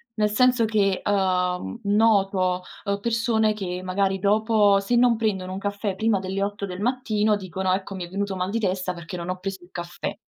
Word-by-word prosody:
nel 210 -1 +2
senso 250 +1 +4
che, 200 -3 +1
uhm, 185 +1 0
noto, 195 -3 +2 0.2
uhm, 200 -1 -1
persone 225 -1 +1
che, 180 -3 -4
magari, 190 +1 0
dopo 210 0 +3
se 200 +5 0
non 240 -1 +4
prendono 190 -5 -1
un 190 - -4
caffè 200 0 -2
prima 220 +1 +2
delle 190 +1 -3
8 200 0 -2
del 185 -1 -7
mattino 215 -3 +1
dicono: 190 -1 -2
"Ecco, 190 +1 -3
mi 185 -2 -5
è - - -13
venuto 200 +1 -2
mal 185 0 -2
di 225 +3 -1
testa, 185 -3 -1
perché 170 +1 -7
non 170 0 -5
ho 185 - -2
preso 190 0 -5
il 175 - -17
caffè." 175 +3 -5
200 Hz, 200 wpm, -24 LUFS, 185-215 Hz, 0.2 s, senso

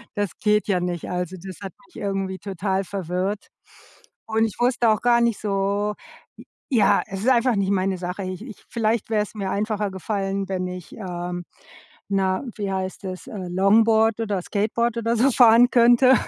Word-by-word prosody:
das 205 -1 0
geht 210 0 +2
ja 190 -3 +2
nicht, 175 -2 -3
also, 180 0 -3
das 190 -2 -8
hat 195 -2 -7
mich 355 - -27
irgendwie 195 -1 -2
total 195 0 -2
verwirrt. 190 +1 -3 0.8
Und 225 0 +2
ich 220 - -4
wusste 240 -1 +3
auch 215 -2 +2
gar 240 -1 +4
nicht 235 -3 +1
so 200 0 0 0.8
ja, 220 -6 +4
es 195 0 -6
ist 240 - +2
einfach 250 -1 +3
nicht 200 -1 0
meine 190 -1 0
Sache, 180 +2 -5
ich 185 +1 -5
ich 225 -5 -12
vielleicht 225 -1 0
wäre 215 -2 +2
es 210 - -10
mir 195 -2 -3
einfacher 210 0 -1
gefallen, 195 0 -3
wenn 185 -1 -2
ich, 180 -1 -8
ähm 175 -3 -5 0.6
na 190 -1 0
wie 200 -2 -3
heißt 190 +1 -4
das, 185 -1 -6
äh, 220 - -7
Longboard 220 +4 +3
oder 205 -4 -1
Skateboard 220 +5 -1
oder 230 0 0
so 255 +5 +4
fahren 240 -1 +6
könnte. 245 +2 +6
200 Hz, 175 wpm, -23 LUFS, 190-225 Hz, 0.8 s, fahren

